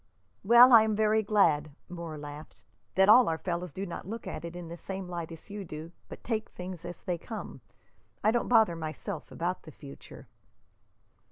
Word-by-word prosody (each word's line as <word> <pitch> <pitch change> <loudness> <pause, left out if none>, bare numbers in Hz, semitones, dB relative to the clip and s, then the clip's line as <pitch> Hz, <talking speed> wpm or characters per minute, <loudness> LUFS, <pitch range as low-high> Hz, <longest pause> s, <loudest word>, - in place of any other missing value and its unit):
"Well, 240 +4 +8
I 230 - +10
am 220 -1 +1
very 215 +1 +3
glad," 160 -9 +2
Moore 170 -3 -7
laughed, 145 -5 -10 0.3
"that 190 +1 +5
all 240 +1 +7
our 160 - -1
fellows 175 0 -4
do 190 +6 -5
not 175 - -7
look 225 +2 -6
at - - -6
it 170 0 -7
in 175 -1 -7
the 170 - -7
same 190 +1 -6
light 170 -2 -5
as 165 +4 -11
you 205 -1 -5
do, 160 -1 -8 0.2
but - - -10
take 225 -2 -2
things 180 -2 -8
as 175 - -8
they 175 -2 -2
come. 220 +5 -8 0.6
I 215 - +4
don't 240 +1 0
bother 220 -7 +4
myself 160 +2 -6
about 175 +2 -3
the 155 - -12
future." 140 -1 -13
180 Hz, 190 wpm, -29 LUFS, 165-215 Hz, 0.6 s, I